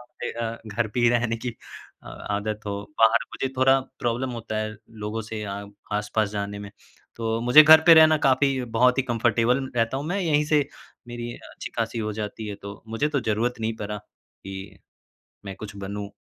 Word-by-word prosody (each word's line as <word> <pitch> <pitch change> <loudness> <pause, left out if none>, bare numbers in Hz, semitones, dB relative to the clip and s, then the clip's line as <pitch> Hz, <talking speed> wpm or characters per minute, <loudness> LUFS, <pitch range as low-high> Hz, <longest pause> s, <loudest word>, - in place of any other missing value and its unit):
मुझे 120 0 -7
अ, 115 0 -4
घर 110 +2 -1
पे 125 - +1
ही 120 - +5
रहने 120 -1 +1
की 120 0 -5 0.5
अ, - - -12
आदत 105 +1 -4
हो, 100 0 -3 0.2
बाहर 115 +1 +5
मुझे 135 - -2
थोड़ा 135 +1 +5 0.2
प्रॉब्लम 120 +2 -1
होता 115 -2 -5
है 110 0 -2 0.3
लोगों 110 +2 -3
से 110 -1 -4
आ 100 0 -5 0.3
आस-पास 105 0 0
जाने 100 -1 -4
में, 100 0 -8 0.5
तो 115 0 -1
मुझे 125 +6 +8
घर 160 +1 +9
पे 165 - +10
रहना 155 -1 +7
काफ़ी 135 0 +3 0.2
बहुत 125 +1 +4
ही - - +4
कंफर्टेबल 120 +2 +1
रहता 115 +3 +1
हूँ 140 - -4
मैं 195 +4 -1
यहीं 150 -4 +2
से 150 -2 +2 0.4
मेरी 120 0 -5 0.2
अच्छी-खासी 115 0 -4
हो 110 -1 -2
जाती 105 +1 -5
है 100 - -4
तो 100 0 -9
मुझे 115 +7 0
तो 145 -2 0
ज़रूरत 115 +2 0
नहीं 110 0 -2
पड़ा 105 0 -4
कि, 95 -1 -12 0.7
मैं 95 -1 -7
कुछ 105 -1 -9
बनूँ। 100 +1 -5
115 Hz, 190 wpm, -25 LUFS, 105-125 Hz, 0.7 s, पे